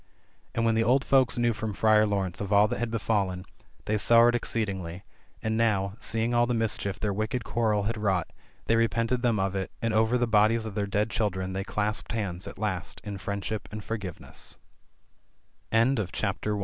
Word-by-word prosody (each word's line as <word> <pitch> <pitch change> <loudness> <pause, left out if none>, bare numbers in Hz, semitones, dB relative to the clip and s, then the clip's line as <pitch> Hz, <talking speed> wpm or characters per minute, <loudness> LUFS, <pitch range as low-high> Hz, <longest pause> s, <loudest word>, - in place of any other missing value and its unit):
And 115 - +1
when 115 - +3
the 115 0 +2
old 130 +4 +3
folks 130 -3 +3
knew 120 -1 +2
from 105 -1 -4
Friar 110 0 +4
Laurence 95 -3 -1
of 100 0 -4
all 105 +1 +6
that 120 - -3
had 120 0 -1
befallen, 100 -5 -1 0.4
they 105 0 0
sorrowed 120 +2 +6
exceedingly, 95 -7 -3 0.4
and 110 0 0
now, 100 -3 +1
seeing 115 +2 -1
all 120 0 +3
the 120 - 0
mischief 105 -3 -1
their 105 -2 -1
wicked 110 +4 -2
quarrel 110 -2 +1
had 110 +2 -2
wrought, 95 -5 0 0.4
they 115 - +3
repented 115 +2 +1
them 115 -4 +2
of 95 0 0
it, 95 -1 -2
and 115 -1 -1
over 110 +3 +3
the 120 - +2
bodies 110 +1 +3
of 110 - -5
their 100 -1 -1
dead 105 +2 0
children 95 -4 -1
they 95 +1 -2
clasped 105 +2 -2
hand?, 95 -5 -3
110 Hz, 160 wpm, -27 LUFS, 100-115 Hz, 0.4 s, all